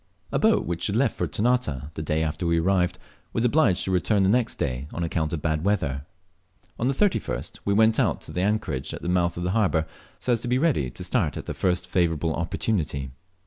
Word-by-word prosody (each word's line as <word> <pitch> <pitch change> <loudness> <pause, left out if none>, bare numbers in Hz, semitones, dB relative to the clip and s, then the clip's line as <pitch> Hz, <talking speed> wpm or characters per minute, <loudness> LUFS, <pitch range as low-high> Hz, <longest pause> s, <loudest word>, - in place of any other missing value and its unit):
A - - +1
boat - - +3
which 85 +2 -2
left 115 +3 +1
for - - -1
Ternate, 100 - 0
the 80 - -5
day 80 +1 0
after 80 +3 -2
we 85 0 +3
arrived, 90 0 +1 0.4
was 115 - +1
obliged 120 - +3
to 95 - -1
return 95 +2 +2
the 95 - +3
next 120 +2 +2
day, 65 +3 -2
on 85 - -3
account 80 -2 -1
of 80 -3 -3
bad 80 -1 0
weather. 80 -8 0 0.7
On 120 - +1
the 135 - +2
31st 200 +4 0
we 100 - +2
went 110 +1 +4
out - - +2
to - - -9
the 90 - -2
anchorage 95 -10 -1
at - - -10
the 85 - -2
mouth 90 -1 +1
of 85 - -3
the 90 - 0
harbour, 95 -7 +2 0.3
so 125 - +1
as 115 - +1
to 120 - -5
be 125 +1 +2
ready 130 - +2
to - - -8
start - - 0
at - - -6
the - - -4
first 90 -1 0
favourable 80 -2 +1
opportunity. 80 - -2
90 Hz, 225 wpm, -25 LUFS, 80-110 Hz, 0.7 s, went